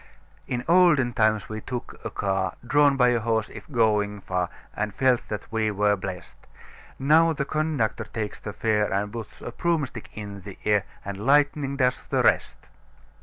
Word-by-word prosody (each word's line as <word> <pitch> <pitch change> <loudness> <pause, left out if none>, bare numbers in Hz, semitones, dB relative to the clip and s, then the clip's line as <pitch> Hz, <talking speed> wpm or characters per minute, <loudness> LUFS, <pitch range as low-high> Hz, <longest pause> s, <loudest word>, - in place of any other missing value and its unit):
"In 125 0 -3
olden 165 -8 +5
times 110 -2 +2
we 110 0 -6
took 125 +1 -6
a - - -3
car 95 -1 -1
Drawn 145 +1 +4
by 125 -1 +5
a 120 -1 +2
horse, 110 -1 0
if - - -11
going 105 -4 +1
far, 90 -2 -1 0.3
And 105 -1 -3
felt 130 -2 +2
that 105 -2 -5
we 110 -1 +1
were 105 0 +2
blest; 95 -2 -7 0.6
Now 160 +4 +4
the 140 -2 -2
conductor 155 -7 -1
takes 105 -2 -5
the 105 - -6
fare 105 0 0
And 100 +2 -1
puts 115 -2 -8
a - - -5
broomstick 145 -6 -2
in 100 -2 -7
the 100 0 -10
air 105 -3 +3 0.2
And 100 -1 -5
lightning 140 +1 +2
does 125 -2 +1
the - - 0
rest. - - +2
110 Hz, 170 wpm, -25 LUFS, 105-135 Hz, 0.6 s, olden